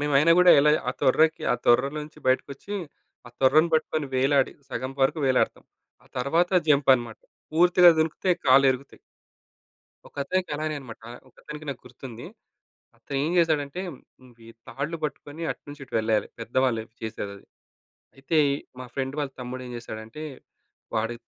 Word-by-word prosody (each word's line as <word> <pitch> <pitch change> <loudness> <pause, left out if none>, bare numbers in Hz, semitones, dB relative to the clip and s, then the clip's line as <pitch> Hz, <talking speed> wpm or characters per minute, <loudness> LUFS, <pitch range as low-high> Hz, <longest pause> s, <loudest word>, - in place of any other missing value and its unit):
మేమైనా 145 +2 +4
గూడా 180 0 +8
ఎలా 150 +1 +4 0.2
ఆ - - +3
తొర్రకి 160 +4 +3
ఆ - - +2
తొర్రలో 135 +5 +3
నుంచి 155 - -15
బయటకొచ్చి, 140 +8 -1 0.5
ఆ - - -11
తొర్రను 155 +5 +4
పట్టుకొని 155 -1 0
వేలాడి 135 +1 +2 0.2
సగం 130 0 -4
వరకు 135 +4 +2
వేలాడతాం. 130 -1 +1 0.4
ఆ - - -23
తర్వాత 165 +8 +1 0.2
జంప్ 140 -2 +4
అనమాట. 120 -3 -5 0.3
పూర్తిగా 175 +2 +6
దుంకితే 160 +4 0 0.2
కాళ్ళు 135 +1 +6
ఇరుగుతయి. 130 +2 -10 1.1
ఒకతనికి 180 +6 -2
అలానే 155 0 -2
అన్నమాట. 120 -5 -11 0.3
ఒకతనికి 150 +4 -11
నాకు 135 -3 -5
గుర్తుంది. 125 -1 -10 0.7
అతను 140 - -7
ఏం 155 - -1
జేసాడంటే 155 -1 +1
హ్మ్, 130 -3 -14
వి 115 - -16 0.2
తాళ్ళు 145 +5 -4
పట్టుకొని 150 +1 -6
అటునుంచి 145 0 -9
ఇటు 125 - -14
వెళ్ళాలి. 110 -1 +1
పెద్దవాళ్ళు 120 -1 0 0.2
చేసేదది. 100 -2 -6 0.7
అయితే, 140 +5 -2 0.4
మా 130 - -6
ఫ్రెండ్ 135 0 -3
వాళ్ళ 145 -2 -2
తమ్ముడు 125 +1 -6
ఏం - - -9
జేసాడంటే, 110 +4 -8 0.7
వాడి 115 +1 -1
140 Hz, 140 wpm, -25 LUFS, 125-155 Hz, 1.1 s, గూడా